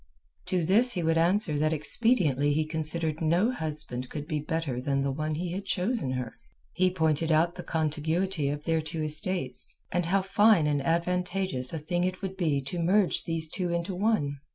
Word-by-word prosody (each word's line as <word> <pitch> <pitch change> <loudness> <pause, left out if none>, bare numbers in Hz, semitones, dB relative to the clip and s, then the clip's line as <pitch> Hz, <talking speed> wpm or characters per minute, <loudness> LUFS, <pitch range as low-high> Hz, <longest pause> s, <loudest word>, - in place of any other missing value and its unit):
To 180 -2 0
this 230 +8 +4
he 175 - -2
would 165 0 +2
answer 170 -3 +3
that 155 +1 +2
expediently 155 - +1
considered 160 0 +1
no 175 +9 +2
husband 150 - -3
could 150 -1 -6
be 155 -3 -1
better 150 -4 -3
than 140 0 0
the 140 - 0
one 155 +2 -2
he 175 +2 -3
had 190 +3 -4
chosen 195 - -1
her. 125 -2 -5 0.3
He 185 +1 +2
pointed 160 -2 0
out 165 +2 +3
the 180 - -7
contiguity 160 +1 -1
of 145 +1 -4
their 160 0 +1
two 160 0 -4
estates, 155 -3 -2 0.2
and 175 -1 0
how 190 +2 +2
fine 205 -3 +4
and 145 -1 +1
advantageous 180 -2 -1
a 165 - -3
thing 175 +3 -2
it 185 +2 -3
would 190 0 -4
be 155 -7 0
to 155 +7 -4
merge 185 +3 +2
these 165 -1 -1
two 180 +3 -3
into 170 +3 -2
one. 180 -8 0
165 Hz, 185 wpm, -28 LUFS, 150-185 Hz, 0.3 s, this